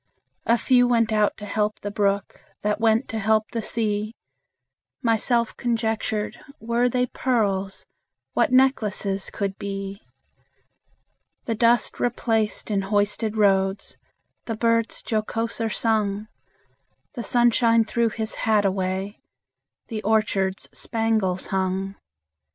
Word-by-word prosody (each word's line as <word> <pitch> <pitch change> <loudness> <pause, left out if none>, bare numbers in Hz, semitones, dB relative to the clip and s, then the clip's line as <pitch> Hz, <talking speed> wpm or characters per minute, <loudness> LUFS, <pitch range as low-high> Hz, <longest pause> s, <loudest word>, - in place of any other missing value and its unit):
A 235 - +5
few 245 0 +4
went 230 -2 +2
out 210 -1 +2
to 210 - -8
help 210 0 -1
the 205 - -4
brook, 200 -1 -1 0.2
That 210 0 0
went 225 +2 +2
to 225 - -3
help 215 +1 +1
the 230 - -2
sea. 215 0 -1 0.9
Myself 235 0 +1
conjectured, 225 -2 -1 0.2
Were 235 +2 +1
they 250 +1 +1
pearls, 200 -7 -1 0.5
What - - +2
necklaces 215 -7 +2
could 195 -2 -3
be! 195 0 -5 1.4
The 230 - -1
dust 235 +2 +2
replaced 225 -3 0
in 200 -1 +1
hoisted 205 +2 0
roads, 195 -1 +2 0.5
The 225 -2 -4
birds 230 0 +1
jocoser 225 +1 -2
sung; 215 -2 0 0.9
The 245 - -5
sunshine 235 -1 +3
threw 235 0 +1
his 220 0 -4 0.2
hat 210 -2 +4
away, 190 +1 -2 0.7
The 220 -3 -4
orchards 200 -3 0
spangles 220 -5 0
hung. 190 +1 -1
220 Hz, 115 wpm, -24 LUFS, 200-230 Hz, 1.4 s, A